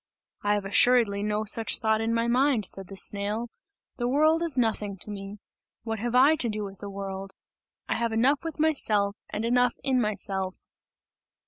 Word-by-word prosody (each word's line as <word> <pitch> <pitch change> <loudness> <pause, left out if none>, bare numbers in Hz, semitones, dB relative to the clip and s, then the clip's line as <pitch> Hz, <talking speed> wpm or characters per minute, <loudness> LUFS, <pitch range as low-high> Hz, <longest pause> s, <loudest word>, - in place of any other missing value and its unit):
"I 205 0 +1
have 205 -1 -3
assuredly 205 0 +3
no 210 +1 -1
such 220 +1 +3
thought 220 0 +1
in 225 +1 -1
my 230 0 +1
mind," 245 -2 +2
said 195 0 -1
the 195 - -9
snail, 210 +4 -2 0.5
"the 240 -2 -1
world 310 +5 +3
is 330 -6 +2
nothing 215 -4 0
to 210 - -8
me! 200 0 -7 0.5
What 225 -2 -4
have 240 +2 -2
I 275 +5 +6
to 240 - 0
do 210 -1 -3
with 195 -1 -8
the 205 - -7
world? 195 0 -6 0.5
I - - -1
have 235 -1 -1
enough 255 +7 +2
with 325 -2 -5
myself, 215 -10 +2
and 220 - -3
enough 245 0 +2
in 260 -2 +2
myself!" 195 -3 -2
220 Hz, 185 wpm, -26 LUFS, 200-245 Hz, 0.5 s, I